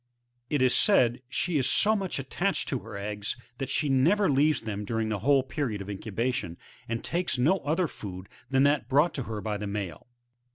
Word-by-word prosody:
It 145 Hz, -3 st, +2 dB
is 125 Hz, -1 st, +4 dB
said, 125 Hz, -, +4 dB
she 165 Hz, +2 st, 0 dB
is 130 Hz, -, +1 dB
so 215 Hz, +1 st, +4 dB
much 195 Hz, -3 st, -2 dB
attached 175 Hz, +9 st, -1 dB
to 130 Hz, -, -1 dB
her 110 Hz, -3 st, -9 dB
eggs, 105 Hz, +2 st, -4 dB, 0.2 s
that 135 Hz, -, -3 dB
she 150 Hz, -, +1 dB
never 155 Hz, +9 st, +3 dB
leaves 145 Hz, +1 st, +3 dB
them 105 Hz, -2 st, -4 dB
during 110 Hz, +1 st, -2 dB
the 105 Hz, -2 st, -1 dB
whole 135 Hz, +4 st, +3 dB
period 130 Hz, -5 st, -3 dB
of 100 Hz, 0 st, -7 dB
incu 105 Hz, +2 st, -6 dB
bation, 110 Hz, -6 st, -2 dB, 0.3 s
and 115 Hz, 0 st, -2 dB
takes 170 Hz, -7 st, -1 dB
no 155 Hz, +10 st, +3 dB
other 165 Hz, +4 st, 0 dB
food 95 Hz, -7 st, -8 dB, 0.2 s
than 135 Hz, 0 st, +3 dB
that 140 Hz, -4 st, +2 dB
brought 145 Hz, +5 st, +3 dB
to 135 Hz, -, -3 dB
her 105 Hz, -2 st, -4 dB
by 105 Hz, -1 st, -2 dB
the 105 Hz, 0 st, -4 dB
male. 100 Hz, -5 st, -5 dB
130 Hz, 205 wpm, -28 LUFS, 105-150 Hz, 0.3 s, is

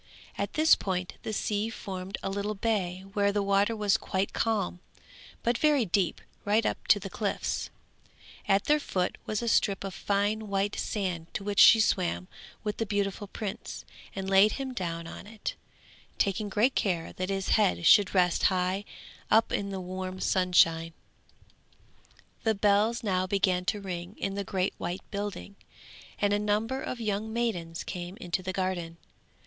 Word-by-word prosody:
At -, -, -3 dB
this 315 Hz, 0 st, +6 dB
point 180 Hz, -2 st, -1 dB
the -, -, -4 dB
sea 210 Hz, +1 st, -1 dB
formed 190 Hz, -3 st, -6 dB
a -, -, -1 dB
little 200 Hz, +2 st, -2 dB
bay 195 Hz, -4 st, -1 dB
where 200 Hz, -1 st, +2 dB
the 205 Hz, 0 st, 0 dB
water 200 Hz, +3 st, +2 dB
was 210 Hz, 0 st, +2 dB
quite 190 Hz, -2 st, -2 dB
calm, 205 Hz, -6 st, 0 dB, 0.6 s
but 235 Hz, 0 st, +1 dB
very 295 Hz, -5 st, +4 dB
deep, 180 Hz, -2 st, 0 dB, 0.2 s
right 210 Hz, +2 st, +2 dB
up -, -, -2 dB
to 205 Hz, -, +6 dB
the 195 Hz, -, -6 dB
cliffs; 200 Hz, +2 st, -2 dB, 0.8 s
at 195 Hz, 0 st, +3 dB
their 300 Hz, 0 st, +3 dB
foot 185 Hz, -10 st, -1 dB
was 215 Hz, +2 st, -1 dB
a -, -, -2 dB
strip 200 Hz, -3 st, +2 dB
of 195 Hz, -1 st, -5 dB
fine 205 Hz, +3 st, 0 dB
white 200 Hz, 0 st, 0 dB
sand 180 Hz, -5 st, -3 dB
to -, -, -2 dB
which 205 Hz, 0 st, -1 dB
she 225 Hz, -, +9 dB
swam 185 Hz, -3 st, +1 dB, 0.4 s
with 210 Hz, -2 st, -2 dB
the 225 Hz, -, -1 dB
beautiful 200 Hz, 0 st, -1 dB
prince, 200 Hz, 0 st, -6 dB, 0.3 s
and 190 Hz, -1 st, -4 dB
laid 195 Hz, +2 st, +5 dB
him 265 Hz, -2 st, -4 dB
down 170 Hz, -6 st, -3 dB
on 175 Hz, -, -9 dB
it, 215 Hz, 0 st, -5 dB, 0.6 s
taking 200 Hz, +1 st, 0 dB
great 220 Hz, +7 st, +2 dB
care 175 Hz, -5 st, -1 dB
that 185 Hz, +1 st, -3 dB
his 195 Hz, -1 st, -2 dB
head 200 Hz, -5 st, +3 dB
should 200 Hz, +1 st, +6 dB
rest 180 Hz, -2 st, +3 dB
high 185 Hz, +2 st, +1 dB, 0.4 s
up 220 Hz, +1 st, +4 dB
in 200 Hz, 0 st, -1 dB
the 195 Hz, -1 st, -4 dB
warm 185 Hz, 0 st, -5 dB
sunshine. 165 Hz, -3 st, +3 dB, 1.5 s
The 220 Hz, -1 st, +1 dB
bells 210 Hz, +4 st, +2 dB
now 185 Hz, -3 st, +1 dB
began 185 Hz, -2 st, +1 dB
to 210 Hz, -, 0 dB
ring 180 Hz, 0 st, -6 dB
in 195 Hz, -, -2 dB
the 200 Hz, 0 st, -2 dB
great 190 Hz, -1 st, -1 dB
white 180 Hz, +2 st, -3 dB
building, 200 Hz, -1 st, -5 dB, 0.6 s
and 205 Hz, 0 st, +2 dB
a 205 Hz, -, +2 dB
number 215 Hz, +5 st, 0 dB
of 250 Hz, -, -4 dB
young 215 Hz, 0 st, -2 dB
maidens 180 Hz, -9 st, -2 dB
came 180 Hz, +1 st, -6 dB
into 185 Hz, -5 st, -2 dB
the 185 Hz, 0 st, -3 dB
garden. 180 Hz, -3 st, -2 dB
200 Hz, 165 wpm, -29 LUFS, 185-210 Hz, 1.5 s, she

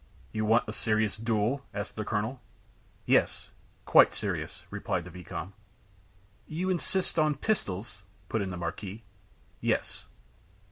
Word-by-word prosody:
"You 110 Hz, 0 st, -1 dB
want 115 Hz, +3 st, +4 dB
a 105 Hz, -, -3 dB
serious 110 Hz, -1 st, +2 dB
duel?" 115 Hz, +4 st, 0 dB
asked 100 Hz, 0 st, -3 dB
the 110 Hz, -, -2 dB
colonel. 110 Hz, +5 st, -1 dB, 0.6 s
"Yes -, -, +2 dB, 0.3 s
quite -, -, +7 dB
serious," -, -, -3 dB
replied 90 Hz, -, -1 dB
the 90 Hz, -, -10 dB
vicomte. 90 Hz, +2 st, -6 dB, 0.9 s
"You 180 Hz, +4 st, -1 dB
insist 180 Hz, 0 st, +2 dB
on 155 Hz, -1 st, +3 dB
pistols?" 105 Hz, -, -1 dB, 0.3 s
put 110 Hz, -, 0 dB
in 95 Hz, -, -1 dB
the 90 Hz, -, -4 dB
marquis. 95 Hz, +5 st, -5 dB, 0.6 s
"Yes." -, -, 0 dB
110 Hz, 130 wpm, -30 LUFS, 100-125 Hz, 0.9 s, quite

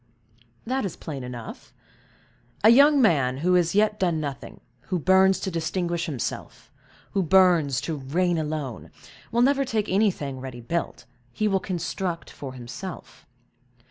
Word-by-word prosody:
"That 260 Hz, +3 st, -1 dB
is 190 Hz, -5 st, -4 dB
plain 140 Hz, -5 st, -7 dB
enough. 120 Hz, -2 st, -9 dB, 0.9 s
A 220 Hz, -, +8 dB
young 285 Hz, +4 st, +6 dB
man 135 Hz, -, +2 dB
who 180 Hz, -, +4 dB
has 175 Hz, 0 st, +2 dB
yet 210 Hz, 0 st, +2 dB
done 175 Hz, -4 st, +1 dB
nothing—who 150 Hz, +5 st, -6 dB
burns 190 Hz, +3 st, +4 dB
to 190 Hz, -, -3 dB
distinguish 170 Hz, +1 st, -2 dB
himself—who 155 Hz, -, -6 dB
burns 170 Hz, -7 st, +4 dB
to 160 Hz, -2 st, -3 dB
reign 165 Hz, +6 st, 0 dB
alone, 150 Hz, -6 st, -4 dB, 0.4 s
will 235 Hz, +1 st, +3 dB
never 275 Hz, +1 st, +3 dB
take 225 Hz, -5 st, -1 dB
anything 180 Hz, -9 st, 0 dB
ready 130 Hz, -2 st, -7 dB
built, 165 Hz, +9 st, -4 dB, 0.3 s
he 215 Hz, -, -1 dB
will 195 Hz, -2 st, +2 dB
construct 175 Hz, -1 st, -4 dB
for 135 Hz, -2 st, -8 dB
himself. 130 Hz, +9 st, -9 dB
175 Hz, 135 wpm, -25 LUFS, 145-195 Hz, 0.9 s, A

